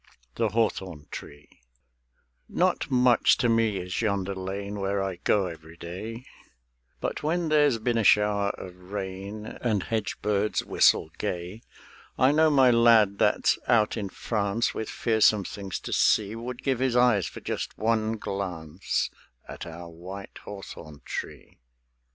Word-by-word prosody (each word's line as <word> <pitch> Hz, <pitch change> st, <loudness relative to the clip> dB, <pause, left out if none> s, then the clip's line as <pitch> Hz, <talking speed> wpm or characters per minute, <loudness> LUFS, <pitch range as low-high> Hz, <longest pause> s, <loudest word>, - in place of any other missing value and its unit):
THE 115 Hz, -2 st, 0 dB
HAWTHORN 95 Hz, -8 st, -2 dB
TREE 75 Hz, +1 st, -9 dB, 1.0 s
Not -, -, +1 dB
much 125 Hz, -2 st, +4 dB
to 120 Hz, -, +1 dB
me 115 Hz, -3 st, +2 dB
is 90 Hz, +2 st, -3 dB
yonder 100 Hz, -3 st, 0 dB
lane 100 Hz, +2 st, -5 dB
Where 100 Hz, +1 st, -1 dB
I 95 Hz, -2 st, -3 dB
go 100 Hz, +2 st, +2 dB
every 80 Hz, -1 st, -9 dB
day; 110 Hz, +9 st, -7 dB, 0.7 s
But -, -, -3 dB
when 165 Hz, +2 st, 0 dB
there's 145 Hz, -5 st, +4 dB
been 115 Hz, +1 st, 0 dB
a -, -, +1 dB
shower 105 Hz, -1 st, +4 dB
of 90 Hz, -1 st, -9 dB, 0.2 s
rain 100 Hz, +1 st, -5 dB
And 110 Hz, -4 st, -2 dB
hedge 110 Hz, -2 st, -2 dB
birds 105 Hz, 0 st, 0 dB
whistle -, -, +3 dB
gay, 90 Hz, +5 st, -4 dB, 0.6 s
I 130 Hz, +2 st, +5 dB
know 155 Hz, +1 st, +4 dB
my 135 Hz, -4 st, +5 dB
lad 115 Hz, -4 st, +5 dB
that's -, -, +3 dB
out 110 Hz, -3 st, +3 dB
in 105 Hz, -4 st, -3 dB
France 105 Hz, +2 st, -1 dB
With 110 Hz, -, -4 dB
fearsome 110 Hz, -3 st, +3 dB
things 100 Hz, -2 st, -5 dB
to -, -, -5 dB
see 105 Hz, 0 st, +3 dB
Would 120 Hz, +2 st, -6 dB
give 135 Hz, -3 st, 0 dB
his 130 Hz, -2 st, +1 dB
eyes 120 Hz, -6 st, +4 dB
for -, -, -8 dB
just -, -, -4 dB
one 110 Hz, 0 st, +1 dB
glance 90 Hz, -4 st, -3 dB, 0.4 s
At -, -, -8 dB
our 85 Hz, +1 st, -8 dB
white 90 Hz, +4 st, -9 dB
hawthorn 80 Hz, -7 st, -9 dB
tree. -, -, -7 dB
105 Hz, 145 wpm, -27 LUFS, 95-115 Hz, 1.0 s, I